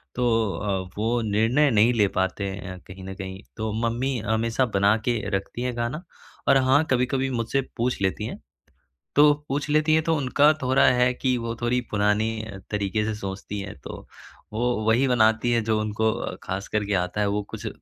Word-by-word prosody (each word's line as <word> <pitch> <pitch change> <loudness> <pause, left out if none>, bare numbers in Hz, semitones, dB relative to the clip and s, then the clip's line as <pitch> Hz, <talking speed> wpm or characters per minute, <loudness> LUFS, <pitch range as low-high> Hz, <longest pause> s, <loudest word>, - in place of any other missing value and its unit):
तो 125 -1 +1 0.3
अ, 95 -3 -3
वो 115 +3 0
निर्णय 115 +7 +2
नहीं 110 +3 +4
ले 105 -3 +3
पाते 95 +1 0
हैं 95 -1 -6
अ, - - -10
कहीं 95 0 -10
न 95 0 -6
कहीं 95 +1 -7 0.2
तो 110 -1 -2 0.2
मम्मी 125 +3 -1
हमेशा 115 +4 +1
बना 100 +2 +4
के 120 -3 +1 0.2
रखती 100 +5 -4
हैं 125 -1 -2
खाना 120 +9 -3 0.4
और 135 - +6
हाँ 145 +4 +5
कभी-कभी 130 +1 +1
मुझसे 120 +2 0 0.2
पूछ 120 -3 -1
लेती 95 +2 0
हैं - - -6 0.8
तो 145 0 +7
पूछ 145 +2 -2
लेती 155 +1 +3
हैं 160 0 +3
तो 165 -1 +1
उनका 145 +2 +4
थोड़ा 130 +2 +3
है 125 0 +3
कि 125 0 0
वो 115 0 -4
थोड़ी 125 +1 +1
पुरानी 105 +2 +1
अ, 100 -3 -8
तरीके 105 +1 -1
से 110 - -1
सोचती 100 0 -5
हैं। 100 0 -7
तो - - -9 0.5
वो 120 +2 0
वही 125 +5 +4
बनाती 115 -1 +3
हैं 115 -2 +2
जो 110 -1 +1
उनको 110 +1 0 0.3
खास 95 +1 -4
करके 105 -1 -1
आता 90 +4 -3
है 100 - +2
वो 105 +1 0
कुछ 110 0 -6
115 Hz, 190 wpm, -25 LUFS, 105-125 Hz, 0.8 s, तो